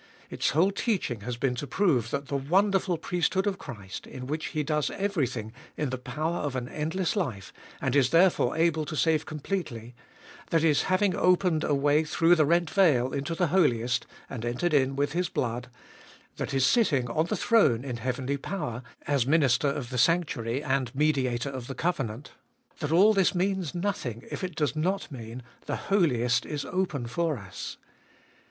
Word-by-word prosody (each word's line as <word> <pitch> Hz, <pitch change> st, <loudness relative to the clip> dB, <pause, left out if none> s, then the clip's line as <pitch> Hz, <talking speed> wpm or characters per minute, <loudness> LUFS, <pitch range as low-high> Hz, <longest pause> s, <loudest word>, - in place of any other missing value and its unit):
Its -, -, 0 dB
whole 175 Hz, +7 st, +3 dB
teaching 195 Hz, -, -1 dB
has 120 Hz, +2 st, -4 dB
been 130 Hz, +1 st, 0 dB
to 135 Hz, +4 st, -5 dB
prove 135 Hz, -, +1 dB
that 140 Hz, +2 st, -3 dB
the 140 Hz, -, -4 dB
wonderful 185 Hz, +5 st, +2 dB
priesthood 180 Hz, +4 st, 0 dB
of 200 Hz, -2 st, -1 dB
Christ, 100 Hz, -7 st, -8 dB
in 130 Hz, -1 st, -8 dB
which 155 Hz, +4 st, -3 dB
He 155 Hz, -, -2 dB
does 150 Hz, -1 st, 0 dB
everything 130 Hz, -, -2 dB, 0.2 s
in 150 Hz, -4 st, -1 dB
the 130 Hz, -, -3 dB
power 155 Hz, +6 st, -2 dB
of 145 Hz, -3 st, -3 dB
an 125 Hz, -1 st, -3 dB
endless 160 Hz, -, -2 dB
life, 125 Hz, -, -3 dB, 0.3 s
and -, -, -1 dB
is 135 Hz, -3 st, +4 dB
therefore 170 Hz, 0 st, +3 dB
able 160 Hz, -1 st, +2 dB
to 155 Hz, -, -5 dB
save 160 Hz, 0 st, +1 dB
completely; 140 Hz, -, -4 dB, 0.6 s
that 165 Hz, -1 st, +2 dB
His 155 Hz, -3 st, +4 dB
having 185 Hz, 0 st, +2 dB
opened 180 Hz, -3 st, +2 dB
a 145 Hz, -, +1 dB
way 145 Hz, +2 st, +3 dB
through 165 Hz, +2 st, +3 dB
the 155 Hz, -4 st, +4 dB
rent 170 Hz, 0 st, +2 dB
veil 135 Hz, -10 st, +3 dB
into 140 Hz, +4 st, -2 dB
the 175 Hz, -2 st, +1 dB
Holiest, 125 Hz, -9 st, +2 dB, 0.2 s
and 120 Hz, -4 st, -6 dB
entered 125 Hz, +8 st, -1 dB
in 135 Hz, -2 st, +3 dB
with 145 Hz, +1 st, 0 dB
His 175 Hz, +1 st, -1 dB
blood; 120 Hz, 0 st, -2 dB, 0.7 s
that -, -, -3 dB
His 135 Hz, -1 st, +2 dB
sitting 140 Hz, -, +3 dB
on 155 Hz, +8 st, 0 dB
the -, -, -1 dB
throne 140 Hz, -, +3 dB
in 125 Hz, -3 st, -4 dB
heavenly 130 Hz, +3 st, -2 dB
power, 145 Hz, -7 st, -4 dB, 0.2 s
as 140 Hz, -4 st, +1 dB
Minister 140 Hz, -3 st, +3 dB
of 140 Hz, -3 st, -3 dB
the 125 Hz, -, -1 dB
sanctuary 140 Hz, -5 st, +1 dB
and 135 Hz, -3 st, -1 dB
Mediator 135 Hz, -3 st, +1 dB
of 130 Hz, -3 st, -6 dB
the 135 Hz, -, -6 dB
covenant; 135 Hz, -7 st, -2 dB, 0.5 s
that 150 Hz, -, -3 dB
all 195 Hz, +6 st, +6 dB
this 195 Hz, -2 st, +2 dB
means 185 Hz, -2 st, -1 dB
nothing 170 Hz, -, -3 dB
if -, -, -5 dB
it 180 Hz, -3 st, -4 dB
does 150 Hz, -1 st, 0 dB
not 180 Hz, +3 st, -1 dB
mean 120 Hz, -1 st, -8 dB
— -, -, -30 dB
the -, -, -1 dB
Holiest 125 Hz, -, +1 dB
is 145 Hz, -2 st, -4 dB
open 175 Hz, -9 st, -2 dB
for 155 Hz, +5 st, -1 dB
us. 95 Hz, -4 st, -8 dB
145 Hz, 185 wpm, -27 LUFS, 125-175 Hz, 0.7 s, all